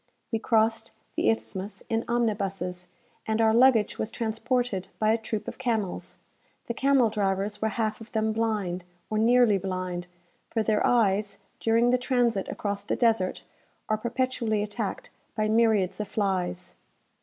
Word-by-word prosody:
We 225 - 0
crossed 225 0 +1 0.2
the - - +2
Isthmus 200 -3 -3
in 225 0 0
omnibuses, 195 -6 -1 0.4
and 220 0 0
our 220 -1 +4
luggage 235 -3 +4
was 220 - -1
transported 225 -3 -1
by 215 0 +3
a 225 - +3
troop 220 -1 -4
of - - -7
camels. 225 -7 -2 0.5
The 235 - -3
camel 265 -3 +3
drivers 205 0 -1
were 220 - +1
half 220 0 -2
of 225 - -11
them 220 -1 0
blind, 210 -6 -1 0.3
or 215 - +1
nearly 235 -2 +5
blind; 185 -1 -3 0.4
for 225 - 0
their 215 -1 +1
eyes, 205 -3 +2 0.2
during 230 +2 +3
the 250 - +3
transit 245 -5 +1
across 200 -1 -3
the 205 - -2
desert, 225 -6 +1 0.5
are 215 - +2
perpetually 235 -3 0
attacked 210 0 -4 0.2
by 215 -1 +1
myriads 215 -4 +2
of 210 - -2
flies. 180 -4 -2
220 Hz, 150 wpm, -27 LUFS, 200-230 Hz, 0.5 s, nearly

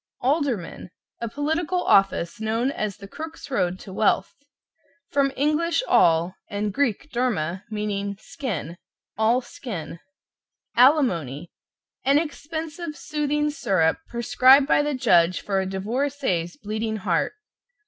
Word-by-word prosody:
=ALDERMAN= 255 - -1 0.3
A 235 - -3
political 320 +7 -1
office 195 +1 +2
known 225 +4 0
as 210 -7 -3
the 200 - -10
Crook's 320 +5 -8
Road 180 -8 0
to 190 - -10
Wealth. 210 - +1 0.8
From 280 -1 +2
Eng. 300 +3 +2 0.3
all, 170 +2 +4 0.2
and 205 0 -2
Greek 280 +2 -1
derma, 195 -8 -1
meaning 205 -2 -3
skin 175 - -5 0.4
"all 225 +3 +3
skin." 180 - -7 0.8
=ALIMONY= 180 - +3 0.5
An 275 +2 +4
expensive 315 +1 -4
soothing 295 -1 -1
syrup, 190 - +1
prescribed 255 +3 +5
by 290 - +3
the 295 -1 -1
judge 185 -8 +3
for 195 -1 0
a 190 - -3
divorcee's 200 - -2
bleeding 220 +1 -3
heart. 185 -5 0
230 Hz, 115 wpm, -24 LUFS, 190-285 Hz, 0.8 s, prescribed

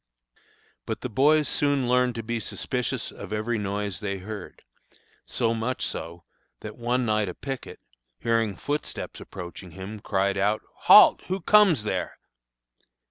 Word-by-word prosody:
But - - -3
the 125 - -4
boys 145 +5 +4
soon 140 -3 +1
learned 125 0 +2
to 115 - -4
be 115 +1 -2
suspicious 125 +2 -3
of 100 - -10
every 110 +2 -1
noise 100 -2 -3
they 100 -2 -3
heard; 100 0 -8 0.6
so 115 -1 0
much 115 +3 -2
so, 85 +1 -6 0.4
that 105 0 -7
one 120 +1 0
night 105 -3 +1
a 90 - -7
picket, 135 -3 -6 0.4
hearing 115 -3 0
footsteps 145 - -4
approaching 90 0 -9
him, 95 +5 -8
cried 100 -1 0
out, 105 +2 +1 0.2
"Halt! - - +9
Who 190 +1 -1
comes 195 - +5
there?" 105 - -3
110 Hz, 140 wpm, -26 LUFS, 100-125 Hz, 0.6 s, Halt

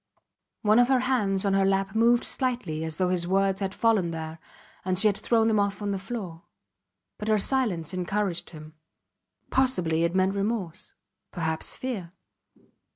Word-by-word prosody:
One 215 +2 +5
of 245 - +5
her 260 -1 +3
hands 210 -7 0
on 200 - +2
her 195 0 +3
lap 195 0 +1
moved 235 +2 +4
slightly 240 - -1
as 160 -1 -5
though 185 -1 +1
his 175 -1 -1
words 195 +1 +1
had 190 -1 -2
fallen 220 -7 +2
there 160 0 -6 0.4
and 185 0 -1
she 205 - +3
had 205 - +2
thrown 225 +1 +2
them 215 -2 +2
off 200 -1 0
on 205 -1 -2
the 195 - -2
floor. 190 -5 -6 0.8
But 210 - -5
her 215 -1 +3
silence 200 - 0
encouraged 185 0 -2
him. 155 -1 -11 0.8
Possibly 180 -12 +2
it 170 +2 0
meant 190 +1 +2
remorse 200 -4 -3 0.4
perhaps 160 -2 -2
fear. 225 -10 -5
195 Hz, 165 wpm, -26 LUFS, 175-220 Hz, 0.8 s, One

